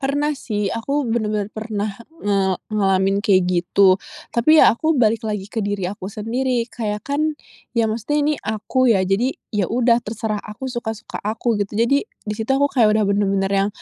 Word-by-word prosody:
Pernah 285 Hz, +2 st, 0 dB
sih, 210 Hz, -7 st, -3 dB
aku 275 Hz, +5 st, -1 dB
bener-bener 215 Hz, -3 st, -1 dB
pernah 215 Hz, -1 st, -3 dB, 0.3 s
nge 195 Hz, -2 st, +1 dB, 0.2 s
ngalamin 195 Hz, -1 st, +2 dB
kayak 190 Hz, -3 st, +3 dB
gitu. 185 Hz, +2 st, +3 dB, 0.3 s
Tapi 275 Hz, +7 st, +4 dB
ya 230 Hz, -, +7 dB
aku 315 Hz, +5 st, 0 dB
balik 225 Hz, -2 st, +3 dB
lagi 210 Hz, -2 st, -3 dB
ke 220 Hz, +2 st, -4 dB
diri 205 Hz, -2 st, -2 dB
aku 190 Hz, 0 st, -5 dB
sendiri 235 Hz, +4 st, -1 dB
kayak, 210 Hz, -3 st, -3 dB
kan 285 Hz, +1 st, -1 dB, 0.6 s
ya 230 Hz, -, +3 dB
maksudnya 225 Hz, +7 st, -1 dB
ini 300 Hz, 0 st, +2 dB
aku 235 Hz, +4 st, 0 dB
ya, 195 Hz, -5 st, +4 dB
jadi 195 Hz, +7 st, +1 dB, 0.2 s
ya 205 Hz, -4 st, 0 dB
udah 235 Hz, 0 st, +3 dB
terserah 215 Hz, -1 st, -3 dB
aku 245 Hz, +5 st, -7 dB
suka-suka 235 Hz, -1 st, -5 dB
aku 225 Hz, +3 st, -1 dB
gitu. 205 Hz, +1 st, -3 dB
Jadi 275 Hz, -, +2 dB
di 220 Hz, -, -7 dB
situ 220 Hz, +2 st, -5 dB
aku 280 Hz, +2 st, +2 dB
kayak 220 Hz, -4 st, +4 dB
udah 215 Hz, -, +2 dB
bener-bener 195 Hz, -1 st, +1 dB
yang 195 Hz, +1 st, +2 dB
215 Hz, 180 wpm, -21 LUFS, 200-240 Hz, 0.6 s, ya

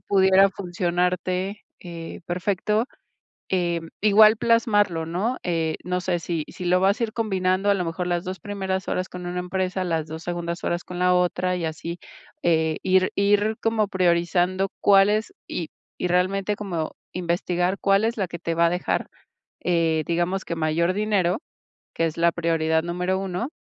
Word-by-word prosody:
pudiera 190 Hz, 0 st, +4 dB
funcionarte, 180 Hz, +1 st, -1 dB, 0.2 s
eh, 170 Hz, -1 st, -8 dB
perfecto, 200 Hz, +5 st, 0 dB, 0.7 s
eh, 175 Hz, -2 st, +1 dB, 0.2 s
igual 215 Hz, +1 st, +7 dB
plasmarlo, 205 Hz, -8 st, +2 dB
¿no?, 205 Hz, +10 st, -1 dB
eh, 165 Hz, -2 st, 0 dB
no 180 Hz, 0 st, -1 dB
sé 180 Hz, -2 st, 0 dB
si 165 Hz, -3 st, -2 dB
si 180 Hz, -, -8 dB
lo 180 Hz, +1 st, +3 dB
vas 195 Hz, +3 st, +2 dB
a 230 Hz, -, +3 dB
ir 215 Hz, -, -5 dB
combinando, 195 Hz, -2 st, +1 dB
a -, -, +5 dB
lo 180 Hz, -2 st, -1 dB
mejor 165 Hz, +2 st, -3 dB
las 175 Hz, +1 st, -1 dB
2 185 Hz, 0 st, -5 dB
primeras 190 Hz, -2 st, -3 dB
horas 185 Hz, 0 st, -1 dB
con 180 Hz, -1 st, -8 dB
una 180 Hz, 0 st, -3 dB
empresa, 185 Hz, +1 st, -2 dB
las 165 Hz, -3 st, -1 dB
2 160 Hz, +1 st, -7 dB
segundas 170 Hz, -1 st, -4 dB
horas 175 Hz, 0 st, -1 dB
con 180 Hz, 0 st, -7 dB
la 180 Hz, 0 st, +4 dB
otra 180 Hz, 0 st, +1 dB
y 170 Hz, -, -3 dB
así, 165 Hz, +2 st, -5 dB, 0.4 s
eh, 160 Hz, -2 st, +2 dB
ir 185 Hz, 0 st, +3 dB
ir 205 Hz, +2 st, +2 dB
como 225 Hz, -2 st, +1 dB
priorizando 180 Hz, +1 st, +1 dB
cuál 195 Hz, 0 st, +6 dB
es, 215 Hz, +1 st, -1 dB, 0.2 s
y 165 Hz, -3 st, -4 dB, 0.3 s
y -, -, 0 dB
realmente 190 Hz, +3 st, +1 dB
como, 175 Hz, -6 st, -4 dB, 0.2 s
investigar 180 Hz, +1 st, -1 dB
cuál 195 Hz, +2 st, +3 dB
es 230 Hz, +1 st, 0 dB
la 190 Hz, -3 st, -1 dB
que 170 Hz, -, -6 dB
te 165 Hz, -1 st, -2 dB
va 170 Hz, 0 st, +4 dB
a -, -, +2 dB
dejar, 180 Hz, +1 st, -1 dB, 0.6 s
eh, 165 Hz, -3 st, +2 dB
digamos 175 Hz, +3 st, 0 dB
que 170 Hz, -, -4 dB
mayor 165 Hz, +3 st, +1 dB
dinero, 205 Hz, -, +1 dB, 0.5 s
que 165 Hz, -, 0 dB
es 160 Hz, -, -4 dB
la 170 Hz, 0 st, +4 dB
prioridad 160 Hz, -1 st, +1 dB
número 180 Hz, +2 st, -1 dB
1 195 Hz, +6 st, -3 dB
180 Hz, 175 wpm, -24 LUFS, 170-195 Hz, 0.7 s, igual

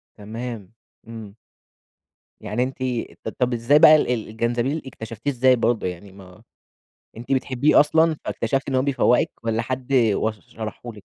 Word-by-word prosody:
تمام، 110 Hz, -1 st, -7 dB, 0.4 s
إمم. 110 Hz, -3 st, -10 dB, 1.1 s
يعني 110 Hz, +4 st, -1 dB
أنتِ 130 Hz, +1 st, -5 dB, 0.5 s
ط -, -, -3 dB
طب 125 Hz, -1 st, +1 dB
إزاي 120 Hz, +6 st, +3 dB
بقى 155 Hz, 0 st, +9 dB, 0.2 s
الجنزبيل 120 Hz, +6 st, -2 dB
اكتشفتيه 115 Hz, +1 st, -5 dB
إزاي 130 Hz, 0 st, +4 dB
برضه 115 Hz, -4 st, 0 dB
يعني 90 Hz, +2 st, -8 dB
ما 95 Hz, -2 st, -16 dB, 0.7 s
أنتِ 120 Hz, +3 st, -8 dB
بتحبيه 135 Hz, +2 st, +3 dB
أصلًا 160 Hz, +2 st, +3 dB
فاكتشفتِ 135 Hz, 0 st, -2 dB
إن 130 Hz, -, -1 dB
هو 130 Hz, -, +3 dB
بيفوّقِك 130 Hz, -3 st, +2 dB
والّا 115 Hz, 0 st, 0 dB
حد 130 Hz, +2 st, -4 dB
وصف 110 Hz, -4 st, +1 dB
شرحه 115 Hz, +2 st, -7 dB
لِك؟ 105 Hz, -2 st, -14 dB
120 Hz, 140 wpm, -22 LUFS, 110-130 Hz, 1.1 s, بقى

